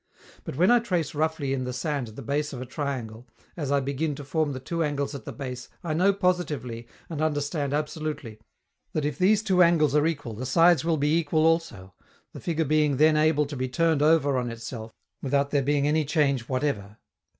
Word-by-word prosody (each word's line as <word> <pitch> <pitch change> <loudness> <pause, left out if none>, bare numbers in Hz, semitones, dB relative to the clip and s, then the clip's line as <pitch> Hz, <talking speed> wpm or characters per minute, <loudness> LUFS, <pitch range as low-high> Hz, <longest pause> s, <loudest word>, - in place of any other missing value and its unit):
But - - -5
when 180 - +4
I 245 - +6
trace 180 - -1
roughly 155 -2 -1
in 130 -1 -2
the 125 - -3
sand 140 0 -2
the 110 +5 -9
base 145 +4 -1
of 130 - -6
a 130 - -5
triangle, 125 -4 -5 0.3
as 145 -5 -3
I 140 - +3
begin 140 +2 -2
to 145 - -8
form 150 +1 0
the 130 - -5
two 165 +5 -2
angles 145 -1 -2
at 140 - -8
the - - -5
base, 130 -3 -7
I 165 -3 -2
know 185 +5 +4
positively, 155 - -1 0.2
and 155 -3 -5
understand 145 -1 -1
absolutely, 150 -6 -3 0.5
that 155 -2 -1
if 150 - -3
these 205 +3 +4
two 185 -4 +3
angles 160 -4 +4
are 150 +1 +4
equal 140 -8 -3
the 125 +4 -5
sides 165 +1 +5
will 165 -1 +1
be 150 +2 +2
equal 155 0 +1
also, 140 - 0 0.4
the - - -8
figure 165 -2 -1
being 150 -1 +2
then 155 +2 +5
able 155 -1 +3
to 145 +1 -7
be 130 0 -2
turned 160 +2 +1
over 150 -3 +3
on 125 -1 -3
itself 115 -1 -7 0.3
without 140 +1 0
there 145 - +2
being 145 +1 +1
any 155 +1 +2
change 140 -5 0
whatever. 120 -7 -2
145 Hz, 205 wpm, -26 LUFS, 130-160 Hz, 0.5 s, I